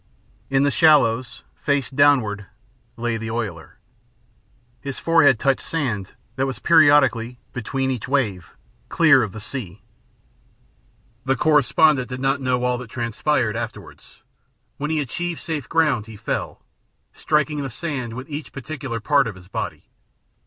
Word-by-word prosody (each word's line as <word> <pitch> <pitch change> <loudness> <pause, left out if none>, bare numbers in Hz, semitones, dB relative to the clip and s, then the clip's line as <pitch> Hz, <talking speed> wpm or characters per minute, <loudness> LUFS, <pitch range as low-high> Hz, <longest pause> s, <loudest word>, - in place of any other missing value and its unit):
In 135 0 +2
the 140 - +2
shallows, 130 -7 +3
face 140 -3 -1
downward, 125 -8 +2 0.5
lay 120 -1 -1
the 110 0 -5
oiler. 110 -8 -5 1.0
His 140 -2 -6
forehead 160 -6 +4
touched 135 +3 +1
sand 120 - -3 0.2
that 135 +1 +1
was 130 -4 -4
periodically, 135 -5 +4 0.2
between 130 +2 -2
each 125 -5 -4
wave, 110 -10 -1 0.3
clear 155 -6 +5
of 110 -4 -2
the 110 - -8
sea. 105 -4 -7 1.4
The 135 0 +2
correspondent 150 -1 +3
did 125 0 -5
not 135 +1 0
know 125 -1 0
all 125 0 0
that 125 -3 -9
transpired 120 0 -1
afterward. - - -7 0.8
When 150 +1 -3
he 160 -1 0
achieved 170 +5 -3
safe 150 -5 -5
ground 150 -10 +1
he 110 -2 -10
fell, - - -4 0.5
striking 150 -1 0
the 135 - -4
sand 130 -4 -4
with 130 +3 -7
each 150 -1 -6
particular 135 -4 -5
part 140 +3 +2
of 110 - -6
his 90 0 -15
body. - - -5
130 Hz, 140 wpm, -22 LUFS, 115-145 Hz, 1.4 s, clear